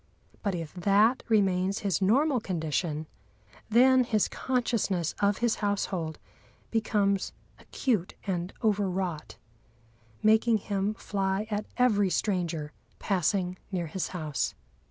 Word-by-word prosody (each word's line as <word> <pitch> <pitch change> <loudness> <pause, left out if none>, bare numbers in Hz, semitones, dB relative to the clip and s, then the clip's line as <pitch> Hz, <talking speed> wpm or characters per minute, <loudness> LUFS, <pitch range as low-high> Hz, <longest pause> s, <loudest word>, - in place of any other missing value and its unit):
But 200 -3 -1
if 165 -3 -5
that 205 +7 +3
remains 195 -2 +2
his 195 -2 +1
normal 260 +8 +3
condition, 160 -4 -2 0.6
then 255 +3 +6
his 220 -4 +1
consciousness 230 - -1
of 200 -1 +2
his 230 - +1
household 190 -6 -2 0.5
becomes 205 -4 +1 0.3
acute 215 -10 -1
and 180 -2 -2
over 205 -3 +2
wrought, 180 -4 -3 0.9
making 220 +1 +4
him 200 0 -2
fly 195 0 -1
at 210 0 -2
every 210 -6 +3
stranger 170 -6 -1 0.3
passing 185 -1 0
near 180 -3 -1
his 170 +4 -3
house. 155 -6 -2
195 Hz, 115 wpm, -28 LUFS, 180-215 Hz, 0.9 s, then